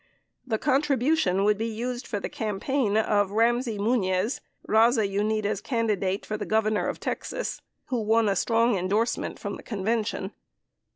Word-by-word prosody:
The 225 -3 0
contribution 270 - +2
would 210 0 +2
be 225 - -1
used 240 +3 -4
for 205 - -2
the - - -4
campaign 215 +1 -1
of 205 -2 +2
Bam 230 +4 +3
sey 230 -5 -4
Muniz, 200 -1 +1 0.3
Baza 225 0 +4
Unida 210 +1 -1
Candidate 210 -6 -1
for 215 - -3
Governor 215 -1 +1
of - - -3
Texas, - - -4 0.3
who 245 -3 0
won 220 +1 +3
a 200 - +2
strong 230 +1 +2
endorsement 210 +6 -1
from - - -5
the - - -11
convention. 210 -1 -2
220 Hz, 150 wpm, -26 LUFS, 205-235 Hz, 0.3 s, Baza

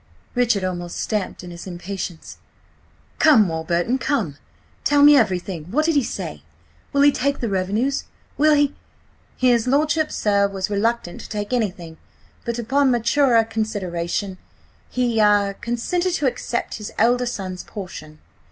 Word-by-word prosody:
Richard 240 -5 +2
almost 175 -2 -4
stamped 210 -4 -3
in 175 - -8
his 170 +2 -9
impatience. 180 -1 -6 0.8
"Come, 230 -10 +6
Warburton, 170 +9 -1
come! 250 - -1 0.5
Tell 290 0 +4
me 295 0 +9
everything. 185 - 0
What 280 - 0
did 330 - +2
he 285 - +4
say? 175 - -5 0.5
Will 280 0 +3
he 290 - +7
take 280 +1 -1
the 235 - -2
revenues? 205 +8 0 0.3
Will 305 +1 +4
he—" 290 -1 +2 0.6
"His 245 -2 +3
lordship, 305 +3 +2
sir, 200 -1 +2
was 195 0 -4
reluctant 205 -2 -1
to - - -11
take 210 +2 -4
anything, 180 -8 -2 0.5
but 235 0 -2
upon 270 +4 +2
maturer 240 0 +3
consideration, 200 -4 -3 0.5
he–ah–consented 235 - +1
to 295 - -1
accept 245 -2 -2
his 210 - -6
elder 245 +3 +3
son's 185 -5 -4
portion. 155 -6 -9
220 Hz, 135 wpm, -22 LUFS, 185-255 Hz, 0.8 s, me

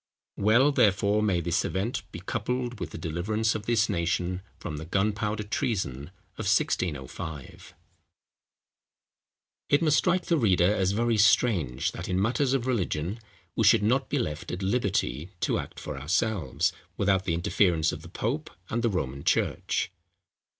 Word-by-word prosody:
Well, 120 +8 +4
therefore, 100 -3 +3
may 95 -5 +1
this 85 0 0
event 100 +6 -2
be - - -8
coupled 120 +4 -3
with - - -4
the - - -8
deliverance 95 +7 -1
of 110 -1 -5
this 115 -2 +3
nation 90 +2 -1 0.2
from 75 -3 -6
the 80 - -6
Gunpowder 105 +4 0
Treason 95 - -2 0.3
of - - -1
1605. 75 -2 -2 1.9
It 145 +3 +4
must 155 -2 +4
strike 180 0 +1
the 165 -3 +2
reader 95 -4 +4
as 95 -2 +1
very 115 +1 +1
strange, 100 - +3
that - - -7
in 90 - +1
matters 125 +6 +1
of 125 -3 -1
religion, 100 -5 -1 0.4
we - - +1
should - - +5
not 125 +5 +2
be 145 - 0
left 80 - -3
at 90 +2 -4
liberty 95 - 0
to - - +1
act - - -7
for 75 -3 -6
ourselves, 85 +1 0 0.2
without 95 -1 +2
the 85 -3 0
interference 85 -2 +2
of 75 - -7
the 85 - -11
pope 135 - -2 0.2
and 115 - 0
the 115 - +2
Roman 70 -8 -3
church. - - 0
100 Hz, 155 wpm, -27 LUFS, 85-115 Hz, 1.9 s, should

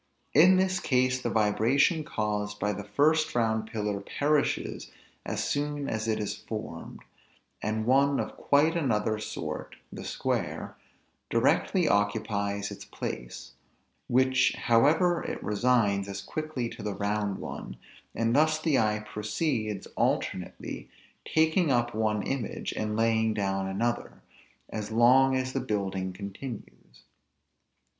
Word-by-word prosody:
In 180 +6 +7
this 185 0 +2
case 130 -1 +1
the - - -1
vibration 115 - +2
caused 105 -3 -2
by 105 0 0
the 100 +1 -6
first 155 +9 +2
round 110 -2 +1
pillar 105 -3 -2
perishes 145 +8 -1 0.4
as - - -1
soon 145 -1 -1
as 110 0 -2
it 110 - 0
is 105 - -2
formed; 105 -7 -7 0.6
and 110 +1 -1
one 140 +3 +3
of - - -3
quite 150 +4 +3
another 110 -8 0
sort 110 - -5 0.2
(the - - -7
square) - - -2 0.5
directly 180 -4 +2
occupies 100 0 0
its - - -8
place; - - -6 0.6
which 130 +1 +3
however 160 +9 +3
it - - -5
resigns 105 -2 +2
as 100 - -5
quickly 155 -6 -4
to - - -9
the 105 -1 -3
round 100 0 -1
one; - - -7 0.4
and 115 +2 +1
thus 155 +1 +4
the 155 -3 +2
eye 105 -1 0
proceeds, 110 - -2
alternately, 90 - -2 0.4
taking 160 0 +3
up 120 -1 +1
one 110 -1 0
image, 135 -4 -3
and 105 0 -2
laying 110 -1 +2
down 95 -2 -1
another, 115 +5 -2 0.4
as 105 -1 -5
long 130 +4 +5
as 130 0 -1
the 135 - 0
building 95 -6 -2
continues. 100 - -9
110 Hz, 130 wpm, -28 LUFS, 105-140 Hz, 0.6 s, In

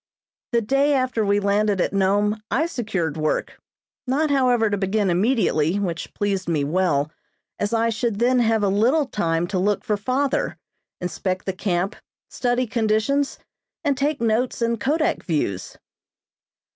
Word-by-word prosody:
The 235 -1 +2
day 275 +6 +2
after 255 -4 0
we 205 0 +2
landed 205 0 +1
at - - 0
Nome 205 +2 +1
I 320 - +1
secured 195 - -2
work. 155 0 -1 0.5
Not, 290 +4 +1
however, 250 -5 +3
to 205 - 0
begin 200 0 0
immediately, 185 - +2
which 175 -5 -3
pleased 195 -3 -1
me 155 -4 +1
well, 155 -2 +1 0.5
as 205 +1 -1
I 230 0 +2
should 225 -1 -1
then 250 +3 +3
have 225 -2 +2
a - - +3
little 235 +10 +3
time 170 -8 -1
to 190 - -1
look 205 +2 +1
for 210 - 0
father, 270 - -1 0.4
inspect 185 +1 -3
the 190 - -1
camp, 190 +1 -1 0.4
study 245 0 0
conditions 225 +6 0 0.5
and 285 -3 +2
take 280 +2 0
notes 235 +2 0
and 235 -1 0
kodak 305 +7 0
views. 120 - -2
210 Hz, 150 wpm, -23 LUFS, 190-250 Hz, 0.5 s, however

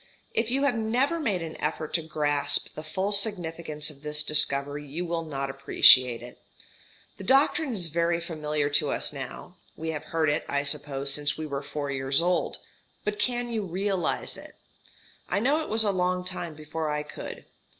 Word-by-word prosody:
If 225 0 0
you 270 +3 +1
have 280 -3 +3
never 245 +9 +1
made 205 - -1
an 160 -1 -7
effort 155 - -2
to 170 - +3
grasp 145 -2 +1
the - - -7
full 190 +6 -2
significance 170 -7 -1
of 140 -2 -16
this 150 0 0
discovery 145 -1 +4
you 165 +6 -4
will 170 -1 -2
not 140 -3 -3
appreciate 130 -3 +6
it. 120 - -12 0.8
The - - -8
doctrine 275 - +3
is 185 -5 -2
very 170 +1 +1
familiar 150 -3 -2
to 145 0 +2
us - - 0
now, 140 +6 -8 0.2
we 160 0 -3
have 150 -2 -5
heard 160 -2 +1
it, 150 - -1
I 140 0 +1
suppose, 140 -1 +1
since 145 0 -1
we 155 - -4
were 140 -2 -3
four 145 0 -4
years 135 0 +1
old, 180 +1 0 0.5
but 210 0 -2
can 245 0 0
you 225 -2 -1
realize 190 -1 -1
it? - - -12 0.7
I 195 - +1
know 280 +8 +2
it 310 - -6
was 220 +1 +2
a 205 - +2
long 180 -1 0
time 175 -3 -5
before 155 +1 -4
I 150 0 -1
could. 150 - -8
160 Hz, 185 wpm, -27 LUFS, 145-195 Hz, 0.8 s, appreciate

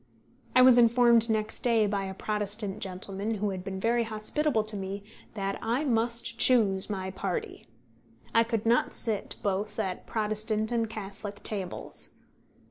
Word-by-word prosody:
I 255 - +8
was 255 -1 +8
informed 235 -1 +5
next 215 0 -1
day 230 -3 +3
by 200 -1 -1
a 190 0 -6
Protestant 210 -1 -3
gentleman 195 +3 -4
who 205 0 -1
had 185 -1 -5
been 190 0 -5
very 235 +3 +2
hospitable 220 +3 0
to 215 0 -8
me 195 0 -5 0.3
that 195 -1 -2
I 240 +6 0
must 235 -1 0
choose 205 -7 +5
my 190 -2 -3
party. 420 - -4 0.7
I 230 - +5
could 225 -2 -2
not 235 +2 +2
sit 220 -4 0
both 205 +1 -1
at 190 -5 -3
Protestant 215 0 -1
and 230 -2 0
Catholic 205 -1 -7
tables. 195 -4 -4
215 Hz, 150 wpm, -28 LUFS, 200-230 Hz, 0.7 s, I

